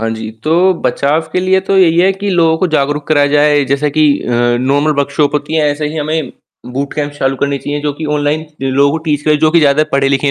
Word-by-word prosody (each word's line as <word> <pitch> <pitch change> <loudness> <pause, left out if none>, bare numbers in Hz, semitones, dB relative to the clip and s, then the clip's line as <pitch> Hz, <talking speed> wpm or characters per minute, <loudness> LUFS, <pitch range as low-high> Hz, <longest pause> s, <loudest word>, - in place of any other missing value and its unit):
हाँ 115 - -2
जी, 110 -1 -6
तो 175 +4 +2
बचाव 145 +3 +1
के 180 - 0
लिए 190 +1 +2
तो 195 0 -1
यही 170 -2 +3
है 190 +2 +4
कि 200 +1 -5
लोगों 165 -2 +2
को 185 - +1
जागरूक 145 +1 -1
करा 145 -2 +3
जाए, 145 0 +2
जैसा 140 +3 0
कि 155 - +4 0.2
अ, - - -5 0.3
नॉर्मल 145 +4 +1
वर्कशॉप 140 +1 0
कि 160 - -1
ऐसे 150 0 -1
ही 160 - -7
हमें 155 -2 -3 0.4
बूटकैम्प 145 +2 -3
चालू 135 -2 -2
करनी 140 +1 -1
चाहिए, 145 +2 -4
जो 145 0 -2
कि 160 - -5
ऑनलाइन, 150 +1 -1 0.2
जो 135 - -2
लोगों 140 +2 +2
को 160 - -1
टीच 150 -2 -1
करें, 150 -1 +2
जो 155 0 +2
कि 170 - +4
ज़्यादा 150 +1 +3
पढ़े-लिखे 140 0 +1
150 Hz, 235 wpm, -13 LUFS, 140-160 Hz, 0.4 s, है